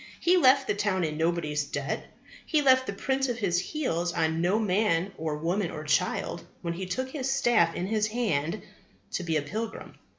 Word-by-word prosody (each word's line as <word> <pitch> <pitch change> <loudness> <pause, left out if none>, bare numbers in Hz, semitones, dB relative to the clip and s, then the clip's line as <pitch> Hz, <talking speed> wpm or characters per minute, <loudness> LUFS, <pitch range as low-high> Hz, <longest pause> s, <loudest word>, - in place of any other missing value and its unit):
He 355 +2 +4
left 270 -5 +5
the - - +1
town 205 -3 0
in 155 -2 -1
nobody's 160 -2 0
debt. 140 -1 -4 0.4
He 305 -2 +1
left 260 -1 +5
the - - -1
print 265 +5 0
of 240 - -2
his 185 -6 +1
heels 180 - -1
on 160 -1 0
no 180 +5 +2
man 195 -3 +1
or 155 -1 -3
woman 175 +4 -1
or 155 - -6
child 155 0 0 0.2
when 170 -1 -2
he 185 +2 -5
took 260 +8 -3
his 270 -3 -3
staff 240 -11 +3
in 175 - -2
his 215 +1 +1
hand 210 -6 -1 0.5
to - - -2
be 165 -2 0
a 145 - -1
pilgrim. 220 +9 -5
190 Hz, 195 wpm, -28 LUFS, 165-240 Hz, 0.5 s, left